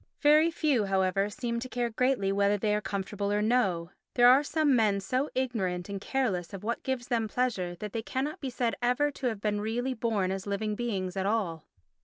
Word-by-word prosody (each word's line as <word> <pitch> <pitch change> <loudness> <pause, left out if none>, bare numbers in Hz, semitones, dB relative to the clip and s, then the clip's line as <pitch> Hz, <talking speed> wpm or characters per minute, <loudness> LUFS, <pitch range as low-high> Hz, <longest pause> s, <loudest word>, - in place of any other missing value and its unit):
Very 305 +3 +6
few, 295 -9 +1
however, 195 +1 +1
seem 235 +2 -3
to 255 +2 -6
care 240 -1 -1
greatly 245 -4 +1
whether 200 +1 +2
they 210 +1 0
are 210 - +1
comfortable 200 0 -3
or 205 - +2
no. 195 -8 +1 0.2
There 245 -1 +7
are 260 +3 +7
some 295 -2 +2
men 210 -4 +3
so 255 +9 -1
ignorant 200 -9 -1
and 200 -1 -4
careless 200 -10 -1
of 195 - -9
what 235 +2 -2
gives 255 -2 -3
them 230 -3 +1
pleasure 205 -7 -1
that 210 +3 -7
they 225 - -1
cannot 265 +6 -3
be 270 - -3
said 245 -2 -1
ever 250 +5 +2
to 270 -2 -3
have 220 -4 -3
been 210 -1 0
really 240 +5 -1
born 220 -6 0
as 195 +1 -4
living 210 +1 -1
beings 200 -5 -3
at 190 0 -1
all. 190 -8 -1
220 Hz, 210 wpm, -29 LUFS, 195-250 Hz, 0.2 s, There